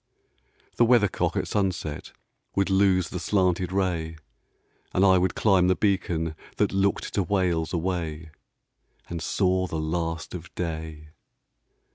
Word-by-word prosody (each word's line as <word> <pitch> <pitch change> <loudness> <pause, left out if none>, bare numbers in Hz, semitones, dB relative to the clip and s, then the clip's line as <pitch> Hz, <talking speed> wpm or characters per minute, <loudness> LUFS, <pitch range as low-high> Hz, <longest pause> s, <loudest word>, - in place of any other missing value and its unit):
The - - +5
weathercock 115 -5 +2
at - - -1
sunset 95 -7 -2 0.4
Would 100 0 +1
lose 95 -3 +3
the 90 - -4
slanted 90 -1 +1
ray, 85 -4 -1 0.8
And 95 - +4
I 95 -1 +6
would 95 +1 0
climb 95 -4 +3
the 95 - +3
beacon 85 -6 0 0.2
That - - +2
looked 100 0 0
to 100 - +1
Wales 90 -4 0
away 85 -3 -3 0.8
And 85 -1 -4
saw 95 +2 +1
the 80 - -4
last 80 +1 -3
of 90 -1 -8
day. 80 -2 -5
90 Hz, 130 wpm, -26 LUFS, 80-95 Hz, 0.8 s, I